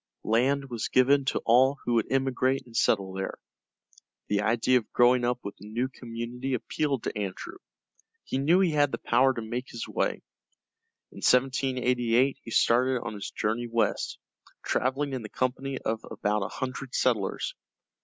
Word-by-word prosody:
Land 135 +5 +1
was 115 -2 -2
given 135 +2 +4
to - - -1
all 130 +4 +5
who 120 - 0
would 115 -2 +1
emigrate 135 0 +1
and 120 -2 -15
settle 95 -4 +2
there. 95 0 -4 0.9
The 105 0 +2
idea 120 +4 +3
of 110 - -15
growing 125 0 +4
up 120 0 +1
with 100 - -5
a 105 - -10
new 120 +4 -2
community 125 +1 -4
appealed 135 +2 -2
to - - -3
Andrew; 100 - -5 0.7
he 130 - -2
knew 165 +7 +4
he 180 -4 +3
had 145 -2 +2
the - - -2
power 130 +3 +3
to 115 - -4
make 120 +3 -4
his 115 - -6
way. - - -1 0.9
In - - -15
1788 125 0 +2
he - - -10
started 125 +3 +3
on 115 - -5
his 100 -1 -6
journey 115 +3 -2
west, 115 -1 0 0.5
traveling 135 +2 0
in 130 - -3
the 110 - -8
company 130 +3 -2
of 110 -2 -3
about 105 +1 -1
a 95 - -1
hundred 130 +2 -5
settlers. 115 -7 0
125 Hz, 165 wpm, -27 LUFS, 115-130 Hz, 0.9 s, all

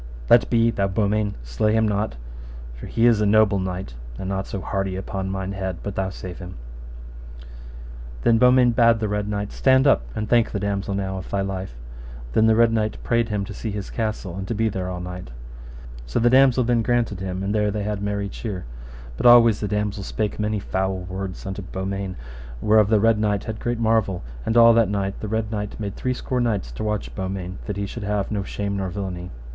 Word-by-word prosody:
Let 120 - +6
be, 115 -1 +3
thou 100 -3 0
Beaumains, 105 +1 0
slay - - 0
him 110 0 +3
not, 105 - -1 0.6
for - - -9
he 115 - +1
is 115 -3 +5
a - - +3
noble 105 -1 +4
knight, 95 -7 -4 0.2
and 95 - -5
not 95 0 -2
so 100 - -4
hardy, 95 0 -2
upon 95 0 -4
thine 95 0 -3
head, 95 -3 -3
but 100 - -4
thou 95 0 -1
save 90 -1 -8
him. 90 -1 -8 1.7
Then 115 -1 +4
Beaumains 125 -1 +5
bade 115 -1 +5
the 110 -1 -2
Red 105 0 -2
Knight, 105 0 -3
Stand 130 0 +3
up, 135 - +5
and 105 - -2
thank 120 -1 +3
the 100 - -3
damosel 100 -1 -2
now 95 -1 -2
of - - -9
thy 100 - 0
life. 95 -7 -4 0.6
Then 110 +7 +4
the 110 - +5
Red 115 0 +4
Knight 110 -1 0
prayed 115 -1 +1
him 105 -2 -1
to 100 - -8
see 110 - -5
his 100 -1 -5
castle, 105 -5 -3
and 95 0 -5
to 115 - -2
be 110 +1 +1
there 95 -2 -3
all 90 -1 -4
night. 90 -6 -7 0.8
So - - -2
the 120 +1 +4
damosel 130 -1 +5
then 120 0 +2
granted 115 -4 0
him, 95 0 -4
and 100 +1 -1
there 105 -1 +2
they 105 0 -2
had 105 -1 -3
merry 100 0 -2
cheer. 100 -2 -6 0.5
But - - +3
always 115 -3 +7
the 105 - -2
damosel 105 0 -2
spake 105 +2 -3
many 105 0 0
foul 95 -1 -1
words 95 +1 -6
unto 95 +1 -4
Beaumains, 95 0 -4 0.4
whereof 105 - +4
the 110 -1 +4
Red 115 0 +3
Knight 105 -2 0
had 110 -1 -5
great 120 0 -2
marvel; 110 - +1 0.2
and 110 - +2
all 115 0 +8
that 115 -3 +3
night 100 -1 -2
the 110 - -5
Red 110 0 -2
Knight 105 -1 -4
made 100 -2 -4
three 130 0 -2
score 125 0 -2
knights 105 - -1
to - - -6
watch 105 -1 -2
Beaumains, 95 -1 -4
that 105 -2 -3
he 100 - -1
should 115 +4 -7
have 105 0 -1
no 105 -2 -1
shame 100 0 -3
nor 95 -1 -2
villainy. 90 -1 -5
105 Hz, 215 wpm, -23 LUFS, 95-110 Hz, 1.7 s, all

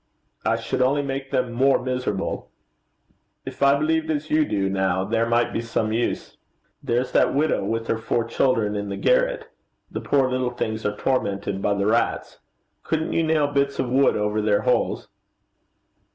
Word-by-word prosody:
'I - - +2
should - - -2
only 140 +3 +2
make 135 0 -4
them 125 -3 0
more 135 +3 +3
miserable. 125 -6 -3 1.0
If - - -8
I 140 0 +5
believed 160 +2 0
as 155 0 -2
you 155 0 +4
do, 100 -5 -1
now, 95 -1 0
there 115 +3 0
might 120 0 +1
be - - -1
some 115 -2 -1
use.' 120 +2 -2 0.4
'There's 125 -1 -1
that - - +3
widow 150 -6 +1
with 115 +3 -2
her 115 - -1
four 115 +1 0
children 115 -3 +1
in 100 0 -3
the 100 - -4
garret. - - +1 0.4
The - - -4
poor 135 -2 +2
little 130 -1 -1
things 110 -3 -3
are 105 0 -3
tormented 100 -6 -1
by 100 0 +1
the 100 0 -1
rats: 115 +3 0 0.4
couldn't 160 0 -2
you - - +2
nail 160 -2 +2
bits 140 -1 0
of 130 -2 -2
wood 135 +2 +3
over 105 +1 0
their 105 -1 +2
holes?' - - 0
125 Hz, 175 wpm, -23 LUFS, 105-140 Hz, 1.0 s, I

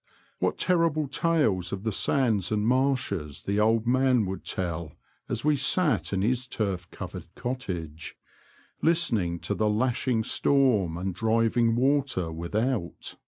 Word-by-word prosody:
What - - 0
terrible 165 -4 +1
tales 135 - +1
of 100 0 -4
the 110 - -1
sands 110 -4 +1
and 105 -1 0
marshes 125 - 0
the 100 +1 0
old 110 +1 +3
man 130 -2 +3
would 95 +1 -5
tell 85 -3 -3 0.4
as 115 - -3
we 150 -1 +4
sat 145 - +2
in 95 -1 0
his 125 +3 0
turf 95 -7 -3
covered - - -8
cottage, 90 - -5 0.7
listening 115 - +2
to - - -2
the 110 -1 +1
lashing 120 +1 +1
storm 110 -12 +2
and 95 +1 -3
driving 115 +3 +2
water 130 - +1
without. 100 +5 -2
115 Hz, 135 wpm, -27 LUFS, 95-130 Hz, 0.7 s, we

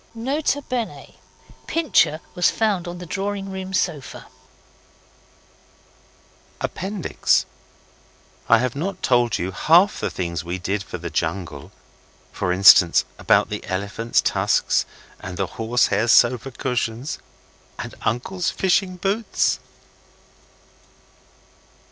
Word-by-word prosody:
N.B. 265 +7 -2 1.3
Pincher 305 - +2
was 180 -2 +3
found 205 -6 0
on 175 0 -6
the 180 - -8
drawing 195 +2 -4
room 190 0 -6
sofa. 175 -7 -2 2.3
Appendix. 190 -1 0 1.0
I 115 - +7
have 125 +1 -1
not 185 +6 -4
told 120 -3 +2
you 90 +2 -3
half 175 - +4
the - - -1
things 85 -3 -4
we 85 +1 -4
did 95 +3 -2
for 90 - -7
the - - -7
jungle 80 -7 -3 0.6
for 90 - -2
instance, 90 -2 +6
about - - +3
the - - -4
elephants' 100 +5 0
tusks - - +1 0.3
and 90 -1 -7
the - - 0
horse 120 0 +1
hair 105 +4 +1
sofa 120 +3 +4
cushions, 125 0 -3 0.6
and - - -6
uncle's 175 - -1
fishing 185 0 +1
boots. 200 +5 0
135 Hz, 105 wpm, -22 LUFS, -, 2.3 s, I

